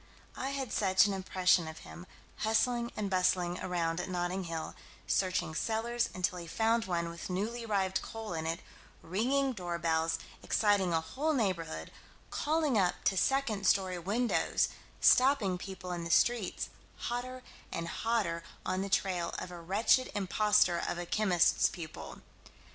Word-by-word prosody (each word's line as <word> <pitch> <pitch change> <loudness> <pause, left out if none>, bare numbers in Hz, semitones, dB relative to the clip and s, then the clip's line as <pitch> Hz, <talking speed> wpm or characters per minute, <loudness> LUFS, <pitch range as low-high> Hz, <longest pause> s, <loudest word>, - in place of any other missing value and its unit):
I 265 - -3
had 275 -4 -3
such 190 -1 +4
an 205 - 0
impression 185 -2 +2
of 160 0 -7
him 175 +1 -10 0.3
hustling 235 +2 +1
and 210 - -1
bustling 185 -1 +1
around 175 -2 -1
at 185 - -6
Notting 180 +1 -2
Hill, 165 -1 -4 0.3
searching 185 -4 0
cellars 235 +6 0
until 180 0 -1
he 170 - -8
found 225 +5 +1
one 170 -2 -1
with 170 +2 -7
newly 220 +6 -2
arrived 190 -3 0
coal 225 -4 -6
in 160 -1 -3
it; 165 +1 -2 0.4
ringing 260 +9 +1
door 175 -5 -4
bells, 165 -1 +1 0.2
exciting 205 -4 +2
a 165 -1 +2
whole 280 - -1
neighborhood, 170 - -2 0.4
calling 300 -6 +1
up 180 -2 +2
to 195 - +2
second 220 -3 +1
story 185 -2 +2
windows, 220 +8 +1 0.3
stopping 250 -9 +5
people 190 -1 -7
in 175 -1 -3
the 170 - -5
streets, 225 +2 +2 0.3
hotter 250 +1 -4 0.3
and 165 0 -3
hotter 205 -5 -1 0.2
on 185 - 0
the 200 - -3
trail 185 -3 0
of 180 - -6
a 175 -1 -8
wretched 210 +8 +3
imposter 205 -2 +3
of - - -2
a 175 - -4
chemist's 180 -3 +3
pupil. 160 -3 -8
190 Hz, 155 wpm, -32 LUFS, 175-225 Hz, 0.4 s, stopping